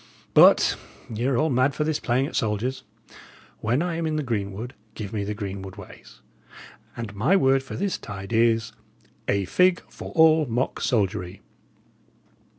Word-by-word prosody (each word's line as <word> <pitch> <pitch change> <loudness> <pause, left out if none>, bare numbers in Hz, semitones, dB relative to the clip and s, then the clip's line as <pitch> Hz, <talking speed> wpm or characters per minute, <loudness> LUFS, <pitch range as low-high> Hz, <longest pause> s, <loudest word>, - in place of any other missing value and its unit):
But - - +6 0.4
ye 115 +3 -2
are 135 -3 +1
all 155 +2 +1
mad 130 +2 +2
for 150 - 0
this 155 -1 -1
playing 125 +2 +1
at - - -7
soldiers. 110 +5 -1 0.8
When 120 +8 0
I 170 -2 -2
am 165 -1 -1
in 155 - -1
the 155 - -1
greenwood, 110 0 -3 0.2
give 105 -1 -6
me 105 -1 -2
greenwood 95 -1 -6
ways; 100 -3 -13 0.8
and 115 -3 -5
my 135 - +3
word 135 -7 +3
for 130 - -8
this 195 0 -2
tide 100 +1 -7
is: 115 -1 +2 0.6
'A 100 -1 +1
fig 180 - +3
for - - -9
all 160 -2 +5
mock 120 +3 -2
soldiery!'" 100 -5 -1
120 Hz, 155 wpm, -25 LUFS, 105-150 Hz, 0.8 s, But